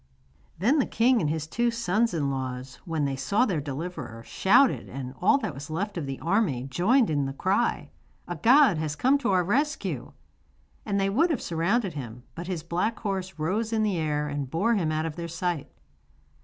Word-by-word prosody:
Then 245 - +3
the 265 - +2
king 240 +1 +3
and 150 - 0
his 155 0 -2
two 235 +9 0
sons 230 -1 +1
in 145 -5 -1
law, 130 -2 -3 0.3
when 160 -4 -1
they 135 -1 -1
saw 205 - +1
their 180 - -1
deliverer, 140 -5 -6
shouted, 245 - +3
and 130 -1 -6
all 290 - +5
that 215 - -3
was 140 +3 -8
left 195 +6 -3
of 160 -6 -3
the 135 -1 -4
army 165 - +1
joined 190 - +2
in 145 -2 +1
the 135 - -4
cry: 195 +10 0 0.4
'A 175 - -4
god 245 - +5
has 155 -1 -2
come 265 - +3
to 255 - -1
our 185 -1 +3
rescue!' 285 - -1 0.7
And 200 -1 +1
they 195 0 +1
would 320 - +3
have 300 -8 0
surrounded 185 +4 0
him, 125 -4 -7
but 170 +4 -7
his 175 -5 -3
black 180 +7 -1
horse 190 -4 -3
rose 205 +9 -1
in 220 -1 +1
the 205 -4 0
air 150 -1 -1
and 145 -2 -3
bore 205 - +1
him 170 -8 +1
out 155 +1 -1
of 160 0 -5
their 170 -1 -4
sight. 170 -2 -3
175 Hz, 200 wpm, -27 LUFS, 150-225 Hz, 0.7 s, all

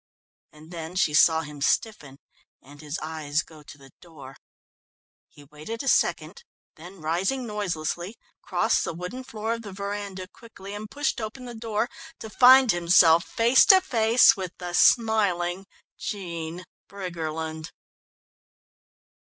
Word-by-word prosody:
And 155 +2 -16
then 165 0 -7
she 170 -5 +1
saw 160 +1 +5
him 150 -2 -10
stiffen 145 -5 -1 0.4
and 145 +2 -16
his 150 +1 -5
eyes 155 -1 -2
go 155 -2 -16
to 145 0 -14
the 135 -1 -17
door. 140 -6 -13 0.9
He 145 - -17
waited 155 - -8
a - - -7
second, 475 - 0 0.3
then 175 +3 -13
rising 190 +12 -1
noiselessly, 185 -2 -4 0.3
crossed - - 0
the 165 - -4
wooden 180 +10 -7
floor 225 -3 -4
of 230 - -6
the 205 -3 -9
veranda 200 -1 -6
quickly 200 -2 -13
and 210 +1 -7
pushed 290 -3 -2
open 230 +4 -7
the 240 - -8
door, 225 0 -2 0.3
to 220 - -10
find 255 0 +6
himself 170 -1 +4
face 235 +3 +4
to 380 - +7
face 230 -8 +4
with 185 -3 -7
the 180 -1 -7
smiling 195 -5 +2 0.3
Jean 170 -3 -6 0.3
Briggerland. 160 -4 -6
180 Hz, 135 wpm, -25 LUFS, 160-220 Hz, 0.9 s, to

